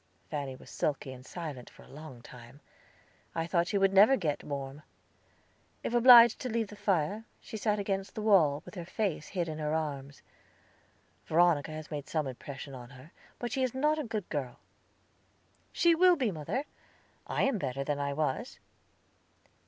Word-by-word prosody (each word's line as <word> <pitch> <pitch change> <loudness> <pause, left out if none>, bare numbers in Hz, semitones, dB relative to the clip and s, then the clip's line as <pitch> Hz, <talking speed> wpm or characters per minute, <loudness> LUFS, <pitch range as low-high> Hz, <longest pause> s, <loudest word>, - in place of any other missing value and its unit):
Fanny 140 -3 -3
was - - -14
sulky 140 -2 -2
and 130 0 -12
silent 145 -5 -7
for - - -17
a - - -18
long 145 -5 -11
time. 125 +2 -13 0.8
I 165 0 -1
thought 170 0 +1
she 200 - 0
never 195 +5 +6
would 270 - +2
get 155 -6 -1
warm. 140 0 -5 1.0
If - - -3
obliged 240 -1 +8
to 255 - -4
leave 225 -2 -1
the 210 - -10
fire, 205 0 0 0.2
she - - -10
sat 210 0 0
against 195 -1 -3
the 215 - -4
wall, 165 -8 +4
with - - -11
her 180 -4 -6
face 175 -3 -2
hid 175 -3 -2
in 155 -1 -5
her 150 0 -1
arms. 140 -3 -4 1.0
Veronica 165 -2 +3
has 155 +1 -8
made 145 -2 -5
some 155 -2 0
impression 135 +1 -7
on 125 -2 -9
her; 130 +5 -14 0.3
but 240 -2 -4
she 265 - -1
is 255 -1 0
not 300 +3 +2
a - - -1
good 215 -6 -4
girl." 135 -5 -4 1.1
"She 340 -1 +4
will 360 +2 +6
be, 255 -9 0
mother. 185 - -3 0.6
I - - 0
am 270 -6 +1
better 135 -3 -2
than 145 0 -2
I 140 0 -1
was." 150 -2 -2
165 Hz, 175 wpm, -30 LUFS, 140-215 Hz, 1.1 s, obliged